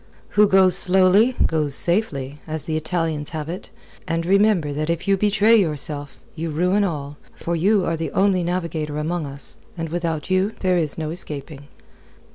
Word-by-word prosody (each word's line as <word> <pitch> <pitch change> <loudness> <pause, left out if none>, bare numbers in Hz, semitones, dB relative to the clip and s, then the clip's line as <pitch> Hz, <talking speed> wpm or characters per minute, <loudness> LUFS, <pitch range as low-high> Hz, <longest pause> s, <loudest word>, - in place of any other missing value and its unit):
"Who 210 0 +4
goes 190 -2 +4
slowly, 190 +6 +4
goes 150 -4 0
safely, 150 -7 0
as 155 -2 -3
the 155 0 -3
Italians 155 -2 -2
have 150 -1 -5
it. 175 +3 -7 0.4
And 165 -1 -1
remember 195 -5 +3
that 155 +2 -3
if 170 +3 -2
you 195 - +4
betray 210 +3 +3
yourself, 150 -5 -2 0.2
you 165 0 -4
ruin 180 +6 +1
all, 145 -6 -4 0.2
for 170 - -3
you 195 +3 +2
are 165 - 0
the 165 0 -3
only 190 -2 +2
navigator 170 -4 -3
amongst 155 -1 -3
us, 140 +1 -4 0.2
and 165 -1 -4
without 165 0 -3
you 190 +3 +1
there 185 -2 +2
is 155 -4 -2
no 155 -1 -3
escaping." 145 -4 -5
165 Hz, 170 wpm, -22 LUFS, 155-190 Hz, 0.4 s, Who